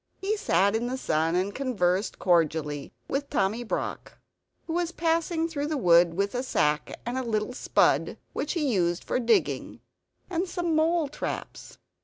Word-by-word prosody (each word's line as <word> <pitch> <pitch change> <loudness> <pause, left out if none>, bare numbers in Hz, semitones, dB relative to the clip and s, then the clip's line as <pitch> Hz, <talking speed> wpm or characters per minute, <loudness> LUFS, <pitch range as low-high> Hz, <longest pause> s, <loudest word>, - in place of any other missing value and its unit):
He 405 +3 -1
sat 200 - +2
in 235 +2 0
the 255 +1 -2
sun, 160 -6 0
and 190 +3 0
conversed 205 -8 0
cordially 155 -5 +1 0.2
with 280 +1 -2
Tommy 225 -2 0
Brock, 235 - -4 0.5
who 325 - -4
was 345 0 0
passing 330 0 0
through 295 -3 -3
the 305 -1 -1
wood 170 -6 +5
with 200 +2 0
a 250 - -1
sack 150 - 0
and 245 +2 -2
a - - -2
little 220 0 -1
spud - - +2 0.2
which 295 - -2
he 300 -8 0
used 175 -2 +1
for - - -1
digging, 235 -2 +1 0.5
and 360 0 -2
some 345 -3 -1
mole 320 0 +2
traps. 280 - -6
245 Hz, 165 wpm, -27 LUFS, -, 0.5 s, wood